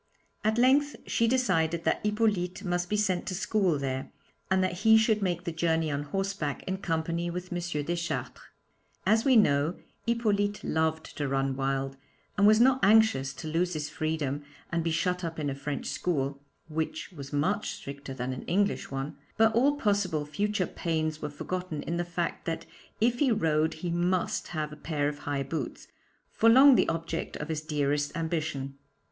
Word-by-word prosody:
At 215 +1 +2
length 275 +4 +4
she 230 - +1
decided 170 -10 +1
that - - 0
Hippolyte 210 -3 0
must 175 -1 -1
be 210 - +1
sent 190 -4 0
to 185 - -2
school 195 -4 +1
there, 135 -1 -3 0.4
and 190 0 +3
that 180 -1 -1
he 220 +2 +6
should 220 -1 +3
make 175 -2 -1
the 170 - -3
journey 160 -1 +1
on 145 0 -2
horseback 195 -4 -2
in 190 0 -2
company 170 -1 -1
with 180 +1 -5
M. 175 - -1 0.2
Deschartres. 170 +2 -3 0.6
As 220 +1 +4
we 265 -2 +5
know, 150 -5 +4 0.3
Hippolyte 210 -3 +1
loved 160 0 -1
to 145 - -1
run 135 0 0
wild, 135 0 -1 0.4
and 205 0 +5
was 215 +1 +6
not 260 +2 +5
anxious 205 -11 +5
to 160 - -7
lose 175 +3 0
his 150 -1 -3
freedom 155 -3 -2 0.3
and 170 -1 0
be 165 - 0
shut 180 +3 0
up 165 -1 -4
in 145 -3 -1
a - - -2
French 140 +1 -4
school 140 -5 -1 0.3
(which 160 +3 -3
was 140 -6 -9
much 145 +1 0
stricter 140 -1 -7
than 130 0 -3
an 130 - -6
English 200 +3 0
one), 135 +2 -4 0.2
but 225 0 +5
all 275 +5 +4
possible 200 - 0
future 200 +5 -1
pains 155 -3 -2
were 150 - -3
forgotten 165 +1 -4
in 170 - -2
the 175 - 0
fact 175 0 -3
that 165 -1 -3 0.3
if 240 +2 +2
he 275 -4 +3
rode 160 -7 +2
he 170 +2 -4
must 175 +1 0
have 155 -2 -3
a - - -8
pair 150 -2 -1
of 145 0 -4
high 140 -1 0
boots 135 -1 -5 0.4
for 230 - +4
long 265 +4 +8
the - - +3
object 165 0 -3
of 150 - -6
his 155 -1 -2
dearest 145 -2 0
ambition. 155 -5 -3
170 Hz, 180 wpm, -29 LUFS, 150-200 Hz, 0.6 s, long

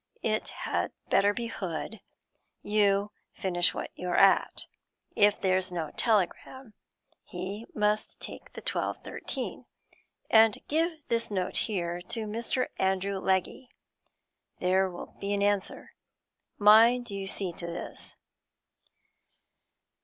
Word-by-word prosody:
It - - 0 0.2
had - - -1 0.2
better 200 +1 +5
be 235 +3 -4
Hood; 200 0 -5 0.6
you 205 -1 +2 0.2
finish 175 -2 +2
what - - -4
you're 180 -1 -2
at. 195 -1 +4 0.5
If 205 0 +4
there's 185 -1 +1
no 165 -3 -3
telegram, 225 +3 0 0.5
he 195 +5 -6
must 210 0 0
take - - -9
the - - -9
twelve - - -1
thirteen, - - -5 0.6
and 220 -1 +6
give 325 +3 +2 0.2
this 230 0 0
note 185 -3 -2
here 175 -4 -2
to 220 +5 -4
Mr. 230 +4 -2
Andrew 190 +1 0
Legge; 190 +6 0 0.9
there'll 185 0 0
be 200 +1 -2
an 200 - 0
answer. 205 -1 -1 0.7
Mind 225 +3 +6
you 195 -1 -4
see 195 -2 -2
to 170 - -6
this.' 170 - -7
200 Hz, 115 wpm, -29 LUFS, 185-215 Hz, 0.9 s, and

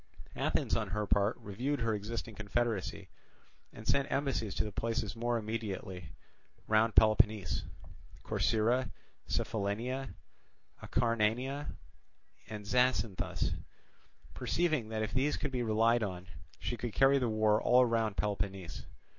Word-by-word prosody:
Athens - - +1
on 110 -3 -1
her 105 +3 -1
part 100 +2 +2
reviewed 125 +8 -3
her 115 -1 +1
existing 110 +2 -4
confederacy, 105 -2 -2 0.6
and 110 - -11
sent 140 0 +2
embassies 135 -8 -1
to - - +1
the 105 - -4
places 115 -1 -2
more 120 +1 0
immediately 100 -6 -4 0.6
round 110 +1 +3
Peloponnese—Corcyra, 110 +3 +1 0.4
Cephallenia, 115 +6 -2 0.7
Acarnania, 120 +4 0 0.7
and 105 -1 -6
Zacynthus—perceiving 125 - -1
that 110 -1 -1
if 110 - -3
these 135 +3 +1
could 145 - -3
be 125 -1 -1
relied 115 +1 +3
on 90 -4 -3 0.3
she 120 - -3
could 115 0 -4
carry 135 +1 +5
the 125 -3 0
war 110 0 +3
all 125 +1 +6
round 115 -3 0
Peloponnese. 95 -3 -3
110 Hz, 115 wpm, -33 LUFS, 105-125 Hz, 0.7 s, all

